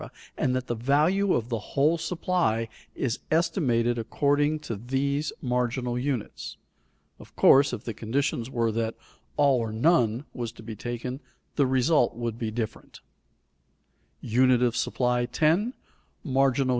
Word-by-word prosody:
and 130 Hz, -, +1 dB
that 130 Hz, 0 st, -3 dB
the 120 Hz, -, -1 dB
value 155 Hz, -, +2 dB
of 115 Hz, 0 st, -1 dB
the 115 Hz, -2 st, -1 dB
whole 145 Hz, +9 st, +1 dB
supply 165 Hz, -10 st, 0 dB, 0.3 s
is 120 Hz, -4 st, -2 dB
estimated 120 Hz, -, +1 dB
according 145 Hz, +6 st, +1 dB
to 115 Hz, -6 st, -5 dB
these 140 Hz, +6 st, -1 dB
marginal 125 Hz, -1 st, -1 dB
units. 130 Hz, -4 st, -4 dB, 0.6 s
Of -, -, -15 dB
course 140 Hz, +1 st, +6 dB
if -, -, -5 dB
the 115 Hz, -, -4 dB
conditions 120 Hz, +2 st, -2 dB
were 115 Hz, -3 st, 0 dB
that 115 Hz, 0 st, -2 dB, 0.4 s
"all 140 Hz, -3 st, +4 dB
or 115 Hz, -2 st, -2 dB
none" 120 Hz, 0 st, +2 dB
was 120 Hz, -3 st, -4 dB
to -, -, -13 dB
be 110 Hz, 0 st, -7 dB
taken, 120 Hz, +4 st, -5 dB, 0.4 s
the 140 Hz, -3 st, +3 dB
result 130 Hz, 0 st, +2 dB
would 115 Hz, -1 st, -4 dB
be 115 Hz, -, -2 dB
different. 110 Hz, 0 st, -6 dB
125 Hz, 120 wpm, -26 LUFS, 115-145 Hz, 0.6 s, course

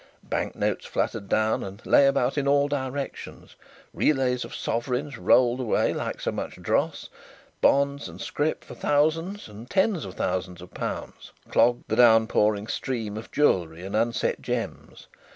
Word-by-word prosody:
Bank -, -, -3 dB
notes -, -, -1 dB
fluttered 100 Hz, -3 st, -2 dB
down 110 Hz, 0 st, +1 dB
and 100 Hz, +3 st, -9 dB
lay 140 Hz, -, +6 dB
about 135 Hz, -1 st, +1 dB
in 140 Hz, -2 st, 0 dB
all 140 Hz, 0 st, +4 dB
directions, 140 Hz, -1 st, -5 dB, 0.4 s
relays 130 Hz, -4 st, +1 dB
of -, -, -8 dB
sovereigns 125 Hz, +2 st, -2 dB
rolled 125 Hz, 0 st, +4 dB
away 125 Hz, -4 st, +1 dB
like -, -, -4 dB
so -, -, -2 dB
much -, -, -5 dB
dross, -, -, -1 dB, 0.5 s
bonds 140 Hz, -4 st, +2 dB
and 85 Hz, +2 st, -11 dB
scrip 150 Hz, +9 st, -2 dB
for -, -, -11 dB
thousands 165 Hz, +7 st, 0 dB
and 110 Hz, +3 st, -11 dB
tens 195 Hz, -, +1 dB
of 95 Hz, -2 st, -8 dB
thousands 90 Hz, -1 st, -3 dB, 0.9 s
clogged 120 Hz, 0 st, +3 dB
the 110 Hz, -, 0 dB
downpouring 110 Hz, -3 st, +4 dB
stream 110 Hz, -2 st, -3 dB
of 110 Hz, -, -8 dB
jewellery 90 Hz, -, +1 dB
and 100 Hz, -, -4 dB
unset 115 Hz, +2 st, 0 dB
gems. -, -, -5 dB
125 Hz, 145 wpm, -26 LUFS, 105-140 Hz, 0.9 s, lay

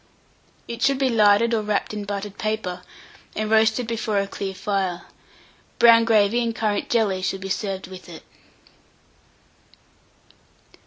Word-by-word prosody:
It 235 Hz, 0 st, -7 dB
should 275 Hz, +1 st, +3 dB
be 265 Hz, -1 st, +1 dB
larded 220 Hz, 0 st, +4 dB
or 225 Hz, -, +1 dB
wrapped 210 Hz, 0 st, -2 dB
in 210 Hz, -1 st, -5 dB
buttered 200 Hz, 0 st, -5 dB
paper, 215 Hz, -5 st, -3 dB, 0.5 s
and 215 Hz, 0 st, -2 dB
roasted 220 Hz, +2 st, +3 dB
before 225 Hz, -2 st, -2 dB
a 200 Hz, -, +1 dB
clear 195 Hz, -1 st, -5 dB
fire. 190 Hz, -2 st, -2 dB, 0.7 s
Brown 230 Hz, -1 st, +6 dB
gravy 220 Hz, +1 st, +3 dB
and 230 Hz, -1 st, -2 dB
currant 210 Hz, -3 st, -1 dB
jelly 210 Hz, -5 st, +1 dB
should 190 Hz, +1 st, -2 dB
be 195 Hz, -, -6 dB
served 195 Hz, -1 st, -3 dB
with 185 Hz, 0 st, -12 dB
it. 165 Hz, -, -11 dB
210 Hz, 140 wpm, -23 LUFS, 195-230 Hz, 0.7 s, Brown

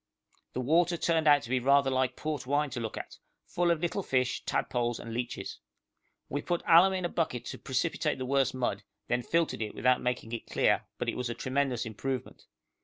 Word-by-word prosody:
The 125 Hz, -, -2 dB
water 170 Hz, +6 st, +3 dB
turned 165 Hz, -1 st, +1 dB
out 145 Hz, -3 st, +6 dB
to -, -, -8 dB
be 130 Hz, -, +3 dB
rather 140 Hz, +1 st, +4 dB
like 130 Hz, -1 st, +1 dB
port 150 Hz, -5 st, -4 dB
wine 145 Hz, +1 st, +1 dB
to 120 Hz, -, -4 dB
look 110 Hz, -2 st, -4 dB
at, -, -, -8 dB, 0.3 s
full 175 Hz, 0 st, 0 dB
of 170 Hz, -2 st, +2 dB
little 175 Hz, +3 st, -1 dB
fish, 130 Hz, -7 st, 0 dB
tadpoles, 120 Hz, -1 st, -1 dB
and 115 Hz, -, -7 dB
leeches. 120 Hz, +1 st, -4 dB, 0.7 s
We 145 Hz, -, -3 dB
put 175 Hz, +2 st, -2 dB
alum 175 Hz, +3 st, +7 dB
in 185 Hz, -1 st, -1 dB
a -, -, +2 dB
bucket 125 Hz, -9 st, -2 dB
to -, -, -6 dB
precipitate 150 Hz, +3 st, -1 dB
the 130 Hz, -, -4 dB
worst 135 Hz, 0 st, +1 dB
mud, 120 Hz, -6 st, -1 dB, 0.3 s
then 120 Hz, +1 st, +1 dB
filtered 165 Hz, 0 st, 0 dB
it 110 Hz, -, -4 dB
without 125 Hz, 0 st, +3 dB
making 125 Hz, -2 st, -2 dB
it 115 Hz, -, -5 dB
clear, -, -, +2 dB
but -, -, -3 dB
it -, -, -1 dB
was 125 Hz, -1 st, -2 dB
a 120 Hz, -, -3 dB
tremendous 130 Hz, -2 st, -1 dB
improvement. 125 Hz, +4 st, -5 dB
130 Hz, 205 wpm, -30 LUFS, 125-155 Hz, 0.7 s, alum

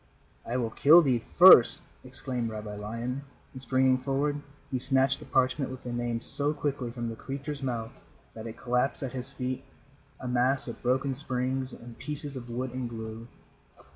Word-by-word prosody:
"I 120 Hz, -, -1 dB
will 115 Hz, -3 st, -1 dB
kill 160 Hz, +9 st, +7 dB
thee 125 Hz, -5 st, +1 dB
first," 175 Hz, -9 st, +9 dB, 0.2 s
exclaimed 125 Hz, -2 st, -4 dB
Rabbi 105 Hz, -1 st, -6 dB
Lion, 115 Hz, +6 st, -4 dB, 0.3 s
and 130 Hz, -, -8 dB
springing 130 Hz, -1 st, +3 dB
forward 140 Hz, +2 st, -1 dB, 0.3 s
he 130 Hz, -, 0 dB
snatched 135 Hz, +1 st, +2 dB
the -, -, -12 dB
parchment 130 Hz, +1 st, +1 dB
with 130 Hz, 0 st, -8 dB
the 120 Hz, -, -5 dB
Name 120 Hz, -1 st, -2 dB
so 145 Hz, +4 st, +2 dB
quickly 140 Hz, -4 st, -2 dB
from 120 Hz, 0 st, -5 dB
the 115 Hz, -, -5 dB
creature's 140 Hz, +4 st, -5 dB
mouth 120 Hz, -3 st, -3 dB, 0.4 s
that 110 Hz, +1 st, -8 dB
it 110 Hz, -, -8 dB
collapsed 125 Hz, +3 st, 0 dB
at 135 Hz, -, -4 dB
his 130 Hz, +1 st, -5 dB
feet 130 Hz, 0 st, -4 dB, 0.6 s
a 130 Hz, -, -6 dB
mass 125 Hz, +2 st, +1 dB
of 120 Hz, -, -7 dB
broken 130 Hz, +2 st, +1 dB
springs 130 Hz, 0 st, -2 dB
and 115 Hz, -1 st, -12 dB
pieces 145 Hz, -1 st, -3 dB
of 120 Hz, -2 st, -7 dB
wood 125 Hz, +1 st, -4 dB
and 130 Hz, -2 st, -3 dB
glue. 110 Hz, 0 st, -7 dB
130 Hz, 175 wpm, -28 LUFS, 120-135 Hz, 0.6 s, first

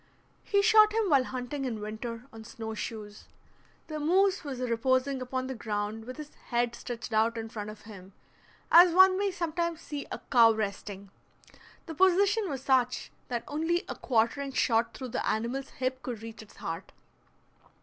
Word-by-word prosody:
He 400 Hz, -1 st, +2 dB
shot 430 Hz, 0 st, +6 dB
him 440 Hz, -5 st, +1 dB
while 270 Hz, -3 st, +5 dB
hunting 255 Hz, +3 st, -4 dB
in 240 Hz, -5 st, -3 dB
winter 225 Hz, +3 st, -6 dB
on 225 Hz, 0 st, -10 dB
snow 220 Hz, 0 st, -7 dB
shoes. 210 Hz, -1 st, -7 dB, 0.6 s
The 310 Hz, -1 st, -5 dB
moose 375 Hz, +5 st, +2 dB
was 275 Hz, -4 st, -5 dB
reposing 255 Hz, +2 st, +1 dB
upon 255 Hz, +1 st, -3 dB
the 265 Hz, -, -4 dB
ground, 215 Hz, -1 st, -4 dB
with 255 Hz, +3 st, -8 dB
his 300 Hz, -1 st, -9 dB
head 240 Hz, 0 st, 0 dB
stretched 240 Hz, -1 st, -6 dB
out 225 Hz, +2 st, +2 dB
in 225 Hz, 0 st, -5 dB
front 210 Hz, -2 st, -6 dB
of 215 Hz, 0 st, -10 dB
him, 195 Hz, -3 st, -12 dB, 0.6 s
as 345 Hz, 0 st, +8 dB
one 375 Hz, 0 st, +7 dB
may 400 Hz, +1 st, +1 dB
sometimes 340 Hz, -2 st, -2 dB
see 290 Hz, -3 st, -6 dB
a -, -, -3 dB
cow 230 Hz, -3 st, +7 dB
resting. 200 Hz, -2 st, -5 dB, 0.7 s
The 325 Hz, -, -6 dB
position 380 Hz, +5 st, +3 dB
was 270 Hz, -3 st, -4 dB
such 255 Hz, -2 st, +1 dB, 0.2 s
that 240 Hz, -2 st, -3 dB
only 325 Hz, +4 st, 0 dB
a -, -, -3 dB
quartering 265 Hz, +3 st, 0 dB
shot 230 Hz, -2 st, +1 dB
through 260 Hz, -2 st, -6 dB
the -, -, -2 dB
animal's 245 Hz, +5 st, -2 dB
hip 260 Hz, 0 st, -3 dB
could 235 Hz, -5 st, -6 dB
reach 225 Hz, -1 st, -8 dB
its 215 Hz, -, -16 dB
heart. 165 Hz, +2 st, -6 dB
255 Hz, 170 wpm, -29 LUFS, 225-310 Hz, 0.7 s, as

